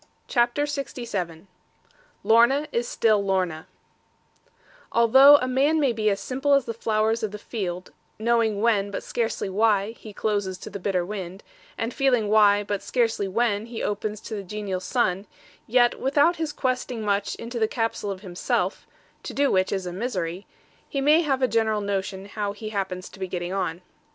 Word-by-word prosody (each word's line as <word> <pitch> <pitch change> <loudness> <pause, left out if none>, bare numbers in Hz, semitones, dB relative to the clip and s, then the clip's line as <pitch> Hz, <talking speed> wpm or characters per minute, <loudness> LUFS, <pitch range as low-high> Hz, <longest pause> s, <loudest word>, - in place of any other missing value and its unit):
CHAPTER 240 +3 +2
LXVII 230 - -4 0.8
LORNA 240 +6 +4
STILL 225 -3 +2
IS 200 - -3
LORNA 180 -5 -1 1.2
Although 265 +5 +7
a 255 - -2
man 280 +5 +2
may 275 -5 +2
be 215 -1 +1
as 200 -1 0
simple 270 +2 +1
as 275 -3 +2
the 230 - -4
flowers 220 0 0
of 215 - -1
the 210 - -7
field; 185 -5 -5 0.3
knowing 225 -2 +1
when, 210 -3 +2
but 200 - -5
scarcely 230 -3 -2
why, 205 +1 +2
he 225 -2 -12
closes 205 -3 -2
to 210 - -9
the 200 - -6
bitter 180 -2 0
wind; 190 -1 -6 0.3
and 230 +1 -3
feeling 250 -6 +2
why, 205 -1 +5
but 205 -1 -3
scarcely 225 -5 0
when, 215 +1 0
he 235 -1 -5
opens 210 +1 -3
to - - -8
the 205 - -3
genial 195 -1 -4
sun; 190 0 -1 0.4
yet 240 +1 +3
without 290 +6 +3
his 320 -2 -2
questing 255 -4 -2
much 200 -1 0
into 235 +1 -6
the 220 - +2
capsule 225 -3 -2
of 190 -1 -5
himself 180 -3 -2 0.3
to - - -7
do 285 0 +2
which 185 0 +2
is 190 -2 -2
a 175 - -5
misery 185 -4 -3 0.4
he 275 - -2
may 300 +4 +5
have 270 -5 0
a - - +5
general 220 -2 +1
notion 195 -1 -3
how 205 0 -3
he 215 +1 -7
happens 190 -3 -3
to - - -14
be 190 - -3
getting 175 0 -4
on. 180 -2 -2
215 Hz, 175 wpm, -25 LUFS, 195-240 Hz, 1.2 s, Although